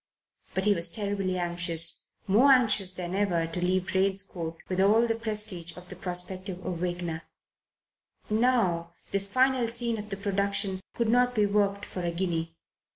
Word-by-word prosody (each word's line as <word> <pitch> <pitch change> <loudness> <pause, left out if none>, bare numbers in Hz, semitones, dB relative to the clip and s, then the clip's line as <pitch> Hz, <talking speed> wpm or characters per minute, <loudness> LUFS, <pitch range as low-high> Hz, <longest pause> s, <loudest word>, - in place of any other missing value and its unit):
But 190 - +2
he 210 - +5
was 170 -2 +2
terribly 200 -2 -2
anxious, 170 -2 0 0.2
more 235 +8 +5
anxious 220 -7 +4
than 180 -1 -5
ever, 190 -4 +1
to 165 +2 -4
leave 185 0 +1
Drane's 195 +1 +2
Court 165 -4 -6
with 185 0 0
all 215 +4 +4
the 230 - +1
prestige 210 -7 -3
of 180 0 -11
the 185 - -7
prospective 185 +1 -3
Awakener. 175 -2 -3 1.1
Now, 210 -8 +1 0.2
this 195 0 +1
final 260 -1 +3
scene 235 -1 -2
of 210 0 -8
the 195 - -3
production 200 -1 0
could 235 - 0
not 245 +1 +3
be 210 -2 +3
worked 200 0 0
for 180 - -6
a 175 - -1
guinea. 170 -2 -2
190 Hz, 160 wpm, -28 LUFS, 175-210 Hz, 1.1 s, he